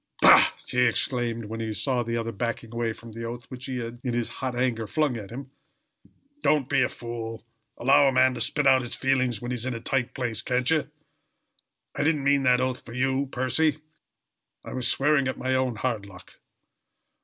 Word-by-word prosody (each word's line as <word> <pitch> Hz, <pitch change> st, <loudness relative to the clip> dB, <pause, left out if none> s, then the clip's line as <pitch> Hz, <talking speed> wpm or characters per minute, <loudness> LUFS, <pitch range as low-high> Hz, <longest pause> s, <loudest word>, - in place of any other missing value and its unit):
"Bah!" -, -, +8 dB
he 125 Hz, 0 st, +2 dB
exclaimed, 120 Hz, -1 st, 0 dB
when 110 Hz, +2 st, -6 dB
he 110 Hz, -1 st, -3 dB
saw 125 Hz, +2 st, 0 dB
the 115 Hz, 0 st, -2 dB
other 115 Hz, 0 st, -3 dB
backing 115 Hz, +1 st, -4 dB
away 115 Hz, -1 st, -1 dB
from 115 Hz, +1 st, -11 dB
the 115 Hz, +1 st, -7 dB
oath 120 Hz, +2 st, -6 dB
which 130 Hz, +1 st, -7 dB
he 130 Hz, -1 st, -3 dB
had, 120 Hz, 0 st, -6 dB
in 125 Hz, -2 st, -2 dB
his 120 Hz, -1 st, -1 dB
hot 130 Hz, -2 st, -2 dB
anger, 120 Hz, -3 st, -1 dB
flung 145 Hz, +4 st, 0 dB
at 105 Hz, -4 st, -7 dB
him, 135 Hz, +3 st, -8 dB, 0.9 s
"don't 150 Hz, -, +2 dB
be 135 Hz, -, +2 dB
a -, -, +2 dB
fool. 115 Hz, -1 st, -7 dB, 0.3 s
Allow 135 Hz, +3 st, +5 dB
a -, -, +4 dB
man 130 Hz, 0 st, +4 dB
to 125 Hz, -, -5 dB
spit 145 Hz, +4 st, 0 dB
out 130 Hz, -1 st, +6 dB
his 120 Hz, -, -4 dB
feelings 130 Hz, -4 st, 0 dB
when 120 Hz, -, -4 dB
he's 125 Hz, 0 st, -3 dB
in 125 Hz, -, -2 dB
a -, -, -4 dB
tight 125 Hz, +1 st, -1 dB
place, 120 Hz, -4 st, -2 dB
can't 125 Hz, +3 st, 0 dB
ye? 155 Hz, -2 st, +2 dB, 1.1 s
I -, -, -2 dB
didn't 150 Hz, -2 st, +1 dB
mean 140 Hz, 0 st, +3 dB
that 125 Hz, -1 st, +4 dB
oath 130 Hz, +1 st, -2 dB
for 115 Hz, -, -11 dB
you, 135 Hz, +2 st, 0 dB
Percy. 130 Hz, +5 st, +1 dB, 0.9 s
I -, -, -7 dB
was 125 Hz, -2 st, +1 dB
swearing 140 Hz, +1 st, +3 dB
at 130 Hz, -, -3 dB
my 130 Hz, 0 st, -1 dB
own 130 Hz, -2 st, 0 dB
hard 110 Hz, -3 st, -2 dB
luck. 90 Hz, -2 st, -14 dB
125 Hz, 205 wpm, -26 LUFS, 115-135 Hz, 1.1 s, Bah